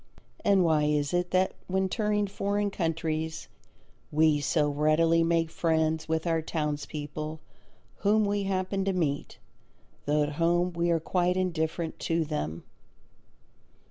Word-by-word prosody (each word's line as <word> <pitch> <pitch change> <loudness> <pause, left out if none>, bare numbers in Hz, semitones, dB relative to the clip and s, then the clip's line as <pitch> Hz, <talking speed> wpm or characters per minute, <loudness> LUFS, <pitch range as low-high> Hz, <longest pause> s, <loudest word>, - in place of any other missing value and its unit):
And 195 -2 +4
why 155 -3 +3
is 150 +1 0
it 175 0 +1
that 185 +1 +2 0.2
when 190 +1 +1
touring 210 0 0
foreign 200 +1 -1
countries 160 -2 -2 0.6
we 155 -1 +4
so 150 +1 +2
readily 155 +3 +3
make 165 -1 +1
friends 160 -1 0
with 160 +1 0
our 165 -1 +1
townspeople 150 0 -4 0.6
whom 210 +1 +3
we 200 0 0
happen 190 0 -1
to 195 - +1
meet, 150 -6 -2 0.7
though 150 +1 +3
at 145 - -1
home 175 +1 +2
we 170 0 0
are 165 -1 +3
quite 180 +2 0
indifferent 165 -2 -2
to 165 -1 0
them? 85 - -4
165 Hz, 135 wpm, -28 LUFS, 155-185 Hz, 0.7 s, And